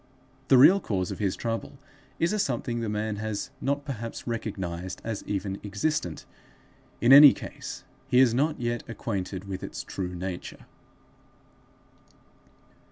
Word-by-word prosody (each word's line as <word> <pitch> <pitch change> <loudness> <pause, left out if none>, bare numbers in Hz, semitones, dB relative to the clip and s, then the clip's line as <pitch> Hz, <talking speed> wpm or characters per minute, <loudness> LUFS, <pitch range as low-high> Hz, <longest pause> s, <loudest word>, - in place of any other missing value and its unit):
The 130 - +6
real 180 +10 +8
cause 95 - -2
of - - -6
his 100 -3 0
trouble 115 +3 -4 0.4
is 170 +5 +1
a 215 - 0
something 120 -6 -1
the 115 -2 -2
man 105 0 -2
has 110 -1 -4
not 140 +1 -1
perhaps 115 -5 -6
recognized 95 -6 -4
as 110 -2 -4
even 100 -1 -3
existent; 100 - -2 0.8
in 120 +3 +6
any 145 0 +11
case - - -8 0.2
he 125 - +2
is 130 -3 +5
not 150 +5 +1
yet 120 -1 -1
acquainted 100 -4 -4
with 95 -1 -5
its - - -6
true 90 -2 -5
nature. 90 0 -6
115 Hz, 140 wpm, -27 LUFS, 95-130 Hz, 0.8 s, any